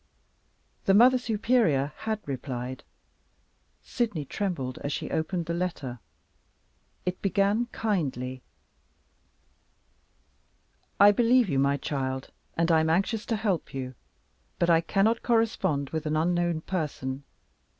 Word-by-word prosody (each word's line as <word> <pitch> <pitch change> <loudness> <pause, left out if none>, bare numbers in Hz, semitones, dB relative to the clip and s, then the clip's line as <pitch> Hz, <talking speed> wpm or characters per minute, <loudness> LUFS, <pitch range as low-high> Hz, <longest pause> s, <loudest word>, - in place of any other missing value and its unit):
The 195 - +5
Mother 250 +4 +7
Superior 210 - +1
had 220 -1 -3
replied. 130 -2 -5 1.0
Sydney 215 - -2
trembled 140 -8 -3
as 145 - -4
she - - -4
opened 165 +2 -1
the 170 - -2
letter. 165 -8 -3 1.1
It 180 0 -2
began 200 +4 +2
kindly. 135 - -2 2.6
"I 205 +1 +9
believe 240 +1 +4
you, 135 - +1
my 140 +1 +2
child, 130 -3 -3 0.3
and 165 +1 +2
I 160 - +5
am 160 0 +1
anxious 195 +6 0
to 230 - 0
help 200 -10 -1
you. 130 -1 -4 0.6
But 170 0 +3
I 165 0 +5
cannot 210 +6 +2
correspond 195 - +1
with 160 -1 -3
an 155 0 0
unknown 175 0 +1
person. 145 -6 -3
170 Hz, 120 wpm, -27 LUFS, 140-210 Hz, 2.6 s, I